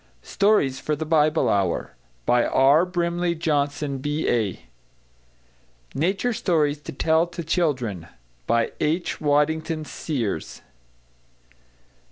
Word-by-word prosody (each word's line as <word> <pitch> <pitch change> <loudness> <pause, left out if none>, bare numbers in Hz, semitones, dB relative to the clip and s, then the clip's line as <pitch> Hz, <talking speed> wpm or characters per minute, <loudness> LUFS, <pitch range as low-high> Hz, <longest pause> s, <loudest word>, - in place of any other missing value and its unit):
=Stories 195 -11 +2
for 150 - -1
the 160 +2 -4
Bible 155 0 +2
Hour= 95 -4 0 0.3
By 120 -1 +3
R. 145 +6 +4
BRIMLEY 175 -1 -1
JOHNSON, 145 -3 -1
B.A. 130 - -1 1.3
=Nature 195 - 0
Stories 150 -8 0
to - - -7
Tell 160 +4 +2
to 170 0 -7
Children= 130 - -1 0.4
By 115 0 +1
H. 165 +4 -1
WADDINGHAM 155 +2 +1
SEERS. 120 - -4
150 Hz, 100 wpm, -24 LUFS, 135-170 Hz, 1.3 s, R